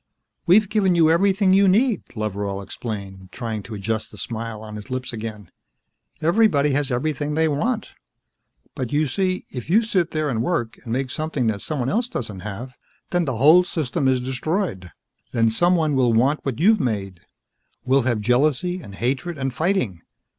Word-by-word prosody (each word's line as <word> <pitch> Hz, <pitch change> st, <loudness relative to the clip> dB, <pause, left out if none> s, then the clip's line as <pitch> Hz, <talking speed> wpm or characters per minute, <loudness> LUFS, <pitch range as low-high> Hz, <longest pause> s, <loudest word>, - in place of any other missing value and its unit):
"We've 205 Hz, +4 st, +6 dB
given 195 Hz, -3 st, +2 dB
you 160 Hz, -2 st, +5 dB
everything 190 Hz, +2 st, +3 dB
you 195 Hz, +1 st, +5 dB
need," 215 Hz, +2 st, +3 dB
Loveral 100 Hz, -2 st, -3 dB
explained, 95 Hz, -4 st, -7 dB
trying 115 Hz, -2 st, -4 dB
to 105 Hz, +3 st, -8 dB
adjust 110 Hz, +2 st, -3 dB
the -, -, -14 dB
smile 115 Hz, -1 st, -5 dB
on 110 Hz, -1 st, -8 dB
his 105 Hz, +3 st, -8 dB
lips 130 Hz, -1 st, -4 dB
again. 110 Hz, -4 st, -7 dB, 0.7 s
"Everybody 165 Hz, -5 st, +3 dB
has 140 Hz, 0 st, 0 dB
everything 145 Hz, +3 st, -1 dB
they 160 Hz, 0 st, +3 dB
want. 215 Hz, -, -1 dB, 0.8 s
But, 130 Hz, -2 st, -4 dB
you 150 Hz, +1 st, +2 dB
see, 185 Hz, +6 st, -1 dB
if 125 Hz, +2 st, -7 dB
you 215 Hz, +6 st, +4 dB
sit 185 Hz, -6 st, +1 dB
there 155 Hz, -1 st, -1 dB
and 115 Hz, -5 st, -1 dB
work 120 Hz, -5 st, -1 dB
and 115 Hz, -, -7 dB
make 130 Hz, +2 st, -1 dB
something 155 Hz, -4 st, -2 dB
that 105 Hz, -3 st, 0 dB
someone 135 Hz, -6 st, -2 dB
else 230 Hz, -, 0 dB
doesn't 105 Hz, -, -5 dB
have, 110 Hz, +6 st, -7 dB, 0.4 s
then 175 Hz, -1 st, +1 dB
the 130 Hz, -5 st, -2 dB
whole 155 Hz, +8 st, +7 dB
system 150 Hz, -6 st, -1 dB
is 130 Hz, -1 st, +3 dB
destroyed. 130 Hz, -, -2 dB, 0.4 s
Then 115 Hz, -1 st, +3 dB
someone 165 Hz, +3 st, +2 dB
will 125 Hz, -3 st, +3 dB
want 135 Hz, +7 st, +2 dB
what 135 Hz, -2 st, -3 dB
you've 215 Hz, +5 st, +5 dB
made. 100 Hz, -7 st, -2 dB, 0.7 s
We'll 135 Hz, +2 st, +4 dB
have 120 Hz, -3 st, 0 dB
jealousy 150 Hz, -, +1 dB
and 100 Hz, -9 st, -10 dB
hatred 135 Hz, -, -2 dB
and 135 Hz, -2 st, -2 dB
fighting. 155 Hz, -, 0 dB
135 Hz, 175 wpm, -22 LUFS, 115-175 Hz, 0.8 s, whole